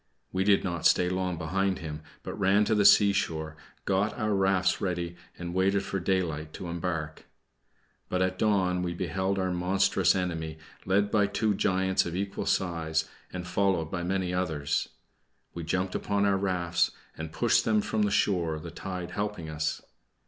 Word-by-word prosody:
We 95 +1 0
did 100 0 +4
not 85 -3 +2
stay 90 - +3
long 90 -1 -1
behind 95 +3 0
him, 75 -2 -6 0.2
but - - -5
ran 100 +2 +4
to 110 - +1
the 105 -2 +3
seashore, 85 -6 +4 0.3
got 100 +2 +1
our 110 -3 0
rafts 95 -2 +2
ready, 85 -2 -2 0.2
and 85 0 -5
waited 95 +2 +2
for 95 0 -3
daylight 85 -5 -1
to 90 - -6
embark. 80 -3 -4 0.8
But 90 0 +1
at 95 0 -1
dawn 95 -4 +2
we 90 -1 -2
beheld 95 +2 -1
our 95 -1 0
monstrous 90 +2 +2
enemy, 80 -4 -2 0.3
led 100 +2 +2
by 105 -2 +3
two 105 +1 +1
giants 95 -1 +1
of 85 - -4
equal 100 +1 -3
size, 80 -3 0 0.2
and 90 -1 -5
followed 90 -4 +1
by 90 - -2
many 90 0 -1
others. 80 -5 -1 0.6
We 85 - -5
jumped 90 +3 -1
upon 100 0 0
our 100 -1 +3
rafts, 90 -3 +1 0.3
and 80 0 -6
pushed 120 +6 +3
them 110 -1 +3
from 110 +1 -1
the 105 - +3
shore, 85 -6 +1
the 85 +2 -8
tide 90 0 -5
helping 100 -4 -3
us. 80 +1 -2
90 Hz, 170 wpm, -28 LUFS, 85-100 Hz, 0.8 s, did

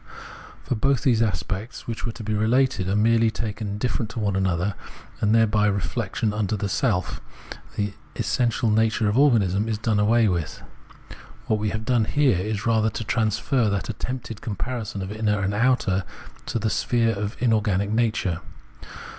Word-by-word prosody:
For - - -1
both 130 +3 +1
the 130 -4 +4
aspects, 100 +2 -3
which 115 +1 -4
were - - -2
to 115 - -8
be 110 0 -2
related, 110 -2 +2
are 100 - +1
merely 115 +1 +4
taken 110 -1 -4
indifferent 105 +2 -2
to 115 - -6
one 100 -2 0
another, 95 0 0 0.5
and 105 +2 +3
thereby 105 -2 +3
reflection 105 +1 -1
into 105 -1 -1
self, 100 -2 -1 0.5
the 105 -1 -1 0.2
essential 120 -2 +1
nature 110 0 +2
of 105 - +1
organism, 110 -7 +3
is 110 -2 -1
done 110 -1 0
away 110 +2 +4
with. 85 -5 -2 0.8
What 110 - +1
we 105 0 0
have 110 +1 -4
done 120 -3 +2
here 135 -7 +2
is 105 +3 -3
rather 110 -1 +3
to 110 - -5
transfer 115 +2 +1
that 100 +2 -2
attempted 115 0 -5
comparison 110 -2 -4
of 95 - -6
inner 105 -1 0
and 100 0 -1
outer 105 -5 +2 0.4
to - - -1
the 110 -1 -1
sphere 115 -2 +1
of 105 +1 -4
inorganic 105 -4 +1
nature. 110 -7 0
110 Hz, 165 wpm, -24 LUFS, 100-115 Hz, 0.8 s, the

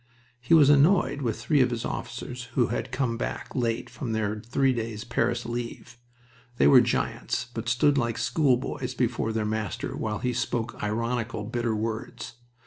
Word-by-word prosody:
He 125 +7 +4
was 145 -3 +7
annoyed 145 -1 +4
with 115 -5 -1
three 145 -4 +2
of 125 - +4
his 120 -1 -3
officers 125 +1 -5
who 120 -3 +3
had 120 - -3
come 125 -3 -1
back - - -5
late 115 -3 -1
from 115 -6 -4 0.3
three 135 +4 +1
days' 115 -2 -4
Paris 120 0 0
leave. 120 0 -5 0.6
They - - +4
were 70 - +8
giants, - - -1
but 115 0 -3
stood 135 +4 +3
like 115 -2 -1
schoolboys 130 -1 0
before 120 -2 0
their 110 -1 -1
master 105 -3 -3
while 110 -1 -2
he 125 +2 -1
spoke 120 -1 -2
ironical, 115 +1 -2
bitter 120 +1 -1
words. 115 +3 -4
120 Hz, 160 wpm, -27 LUFS, 115-125 Hz, 0.6 s, were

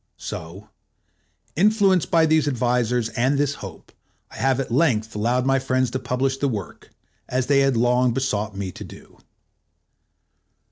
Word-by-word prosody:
So, 90 +6 -8 0.9
influenced 195 -1 +3
by 165 -1 +4
these 155 -1 +2
advisors 125 -3 0
and 125 +5 0
this 140 0 +1
hope, 95 -4 -10 0.4
I - - -12
have 135 -1 +1
at 135 - -4
length 115 -6 +1
allowed 120 +4 0
my 135 0 +2
friends 130 -1 0
to 130 - -2
publish 130 +2 -1
the 140 - 0
work, 100 -8 -7 0.4
as 125 0 0
they 140 +1 +3
had 135 -3 +2
long 125 +1 +2
besought 110 -5 -2
me 95 -2 -4
to - - -9
do. - - -14
125 Hz, 150 wpm, -22 LUFS, 115-135 Hz, 0.9 s, by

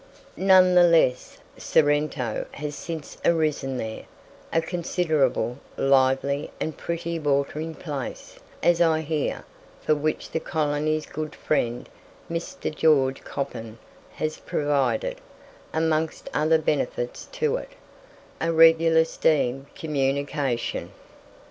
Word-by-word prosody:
None 185 -1 +5
the 180 - +7
less, 165 -7 +3 0.2
Sorrento 145 -5 +1
has 150 0 -5
since 160 -2 -7
arisen 150 -5 +1
there 110 -2 -5 0.5
a 165 - +3
considerable, 160 -7 0 0.2
lively, 135 +1 +2
and 160 - -3
pretty 170 0 -3
watering 150 +2 -1
place, 145 -6 -6 0.2
as 175 0 +4
I 160 -2 +3
hear, 155 -1 -2 0.4
for 155 - +2
which 155 +1 -2
the 160 - -1
colony's 155 0 -1
good 155 0 -6
friend, 120 -5 -1 0.4
Mr. 165 -2 -4
George 135 -4 +3
Coppin, 115 -5 -5 0.4
has 155 0 -3
provided, 150 - 0 0.5
amongst 160 0 -1
other 155 +2 +3
benefits 485 - -2
to 470 -1 0
it, - - -8 0.7
a 165 +1 +1
regular 165 0 +6
steam 140 -5 +1
communication. 140 -3 -1
155 Hz, 105 wpm, -25 LUFS, 140-165 Hz, 0.7 s, the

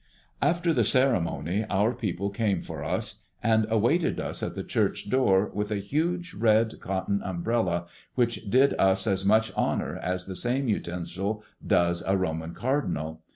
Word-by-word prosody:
After 170 0 +2
the 120 - +3
ceremony 105 - +1
our 105 +5 +2
people 100 -5 -3
came 100 -1 0
for - - -6
us - - -3 0.2
and 110 -1 +3
awaited 120 +10 +2
us - - -3
at - - -3
the - - -4
church 100 - -1
door 105 -6 +3
with 105 0 -2
a 105 - -1
huge 165 - -1
red 110 +1 +2
cotton 95 +1 -2
umbrella, 90 -2 -1 0.3
which 120 -4 0
did 130 +5 +4
us 95 +2 +3
as 95 -3 +1
much 110 +3 +3
honor - - -1
as 90 0 -2
the 95 - -6
same 125 +6 +1
utensil 95 +1 -2 0.2
does 85 0 +2
a 95 0 +3
Roman 80 -2 -3
cardinal. 90 - -2
105 Hz, 155 wpm, -27 LUFS, 95-120 Hz, 0.3 s, did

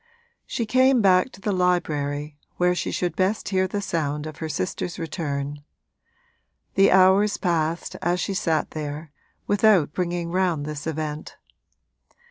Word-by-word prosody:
She 230 - -2
came 255 +3 +4
back 190 +3 +4
to 195 - -14
the 205 - -1
library, 150 -5 0 0.2
where 180 0 +3
she 180 - -2
should 175 -3 -2
best 195 +3 0
hear 190 -1 +1
the 200 +2 -3
sound 150 -5 -2
of 155 -1 -7
her 160 - -4
sister's 175 +3 -3
return; 145 -4 -4 1.1
the 195 0 +5
hours 190 +2 +5
passed 165 -2 -1
as 175 +1 0
she 195 - -2
sat 165 -4 0
there, 150 0 -6 0.3
without 200 -7 +3
bringing 175 -1 -2
round 175 -5 0
this 150 0 -5
event. 155 -1 -4
175 Hz, 140 wpm, -24 LUFS, 155-190 Hz, 1.1 s, the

